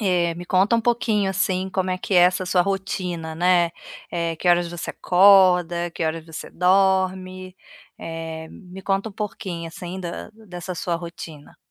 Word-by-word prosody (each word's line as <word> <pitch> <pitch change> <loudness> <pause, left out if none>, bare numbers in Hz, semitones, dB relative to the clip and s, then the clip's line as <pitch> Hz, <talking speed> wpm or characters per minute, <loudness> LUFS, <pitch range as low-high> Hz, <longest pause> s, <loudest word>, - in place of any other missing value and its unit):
Eh, 175 -4 +1
me 175 +1 -8
conta 195 +5 +3
um 230 - +1
pouquinho, 225 -4 +1
assim, 190 0 0
como 185 -1 -1
é 185 - -1
que 190 - -3
é - - +7
essa 180 +1 +4
sua 180 -1 +3
rotina, 180 -4 -3
né. 175 0 +3 0.4
Eh, 170 -1 -2
que 180 - -1
horas 175 0 +4
você 175 -1 -5
acorda, 180 -2 +4
que 165 - -4
horas 160 0 -2
você 160 -1 -8
dorme? 185 0 +1 0.4
Eh, 160 -1 -6
me 185 -1 -11
conta 195 +2 0
um - - -12
pouquinho, 185 -5 -5
assim 175 +2 -7
da 175 +3 -6
dessa 185 -4 -8
sua 175 0 -2
rotina. 165 -3 -10
180 Hz, 170 wpm, -23 LUFS, 170-190 Hz, 0.4 s, é